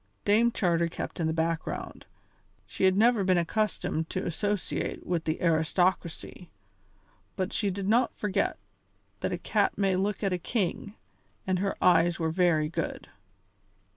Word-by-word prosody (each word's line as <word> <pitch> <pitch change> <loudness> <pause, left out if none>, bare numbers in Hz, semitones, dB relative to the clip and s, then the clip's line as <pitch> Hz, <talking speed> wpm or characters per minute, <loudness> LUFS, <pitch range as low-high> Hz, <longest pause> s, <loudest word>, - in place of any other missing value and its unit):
Dame 225 +4 +4
Charter 170 -6 +1
kept 165 - -6
in 165 - +1
the - - +1
background; 165 0 -3 0.6
she - - -1
had 190 0 +4
never 225 -1 +4
been 185 -1 +3
accustomed 170 -3 -1
to 185 - -3
associate 205 +3 -2
with 175 -2 -1
the 155 0 -1
aristocracy, 170 +1 0 0.9
but 185 +2 -2
she 205 - 0
did 195 0 -3
not 235 +4 +2
forget 205 -3 0 0.6
that - - -2
a - - -1
cat - - 0
may 195 -2 +2
look 200 +3 -1
at 195 -2 +1
a 180 - -1
king, 205 +1 -2 0.5
and 185 -1 0
her 195 +1 -1
eyes 175 -1 +4
were 160 -1 -1
very 165 -3 +2
good. 160 - -4
185 Hz, 150 wpm, -28 LUFS, 165-200 Hz, 0.9 s, Dame